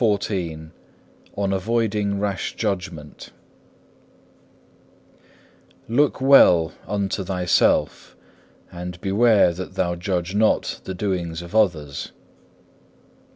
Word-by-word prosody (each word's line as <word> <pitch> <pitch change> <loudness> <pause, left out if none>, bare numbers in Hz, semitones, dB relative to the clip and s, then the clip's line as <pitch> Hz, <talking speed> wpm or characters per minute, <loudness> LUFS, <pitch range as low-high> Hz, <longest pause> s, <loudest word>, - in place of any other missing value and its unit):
CHAPTER 105 -2 +1
XIV 80 -4 -5 0.7
On 100 -1 0
avoiding 105 0 -1
rash 100 -1 -3
judgment 90 -8 -5 2.6
Look 140 +6 +1
well 90 - +5
unto 100 -1 -2
thyself, 90 -1 +1 0.6
and 90 0 -7
beware 100 -1 +3
that 95 +2 -8
thou 90 -2 0
judge 90 0 -3
not 110 +1 +1
the 95 - -5
doings 85 -4 -3
of 85 +2 -12
others. 80 -10 0
95 Hz, 90 wpm, -22 LUFS, 85-105 Hz, 2.6 s, well